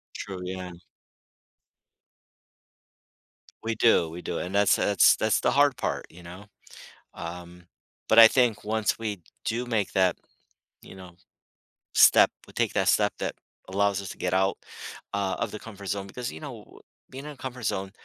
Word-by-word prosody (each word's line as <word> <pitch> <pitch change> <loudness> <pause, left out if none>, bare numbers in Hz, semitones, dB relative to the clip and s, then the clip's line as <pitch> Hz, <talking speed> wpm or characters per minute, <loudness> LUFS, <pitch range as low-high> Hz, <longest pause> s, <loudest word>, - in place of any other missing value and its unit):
True, 95 -2 -6
yeah. 90 0 -6 2.9
We 115 0 -1
do, 110 -7 +4
we 85 +2 -8
do - - -4
and 90 +2 -5
that's 100 0 +4
that's 100 -2 +4
that's 110 0 +1
the 120 - +1
hard 140 -1 +3
part, - - -3
you 90 +2 -15
know, 90 +4 -11 0.7
um, 90 0 -9 0.4
but 110 - +7
I 115 - +12
think 120 -2 +1
once 110 0 0
we 105 -4 -4 0.2
do 120 +2 -2
make 110 -5 -1
that, 95 -2 +2 0.7
you - - -13
know, 90 -2 -12 0.8
step - - +7 0.2
we - - -17
take - - 0
that - - +1
step - - +3
that - - -3 0.3
allows 100 +1 0
us 95 - -7
to - - -9
get 90 0 -1
out, 95 +1 +1 0.6
uh, 100 -1 -1
of 115 - -1
the - - -6
comfort 100 -3 -10
zone 100 0 -3
because, 125 +4 -6
you 80 - -9
know, - - -11 0.3
being 135 +2 -9
in 150 - -6
a 145 - -13
comfort 125 -2 -7
zone, 95 -1 -2
100 Hz, 165 wpm, -26 LUFS, 90-115 Hz, 2.9 s, I